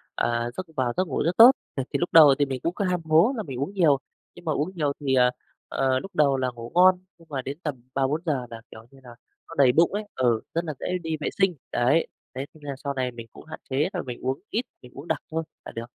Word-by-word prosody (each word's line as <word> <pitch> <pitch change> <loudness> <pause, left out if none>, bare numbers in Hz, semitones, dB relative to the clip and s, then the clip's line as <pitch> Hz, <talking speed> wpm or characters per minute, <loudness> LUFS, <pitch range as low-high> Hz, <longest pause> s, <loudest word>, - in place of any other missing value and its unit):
à, 120 0 0
giấc 185 - -3
vào 125 -4 0
giấc 185 -1 +1
ngủ 135 - -1
rất 170 +2 0
tốt. 235 +3 +11 0.2
Ừ, 135 - -1
thì - - +1
lúc 175 - -1
đầu 150 -4 +8
thì 145 - +4
mình 135 -2 -4
cũng 170 - 0
cứ 200 - -1
ham 180 -2 0
hố 160 +11 +4
là 220 - -2
mình 135 -7 -6
uống 160 +9 -3
nhiều, 160 -8 +4 0.4
nhưng 175 - -14
mà 155 - 0
uống 150 +5 -1
nhiều 150 -4 0
thì, 140 -2 -1
ờ, 125 -1 +5 0.4
ờ, 130 -1 +1
lúc 195 - -10
đầu 140 -3 +3
là 130 -1 0
ngủ 115 0 -8
ngon 180 0 +6 0.2
nhưng 165 - -20
mà 140 -3 -3
đến 135 +3 -6
tầm 150 -4 -2 0.2
3:00-4:00 140 +4 0
giờ 140 -6 -1
là, 115 -1 -9
kiểu 110 - -11
như 135 - -17
là, 125 - -12 0.4
nó 165 - -10
đầy 135 -3 +6
bụng 165 +8 +3
ấy, 210 +1 -2
ừ, 120 -4 +2
rất 170 - 0
là 155 - -3
dễ - - -4 0.2
đi 160 -1 -2
vệ - - -1
sinh, 195 -2 +3 0.2
đấy, 135 +7 +2 0.3
thế 135 - -3
nên 155 - -18
là 140 -1 -5
sau 140 -1 -2
này 130 -2 -2
mình 115 -1 -10
cũng - - -13
hạn 155 - -9
chế 140 +5 +1
là 180 - -2
mình 125 -5 -7
uống 130 +1 -1
ít, 235 +3 -1 0.2
mình 125 - -14
uống 140 +5 -9
đặc - - 0
thôi 160 0 -1 0.2
là - - -7
được. 115 +1 -6
145 Hz, 280 wpm, -25 LUFS, 130-170 Hz, 0.4 s, tốt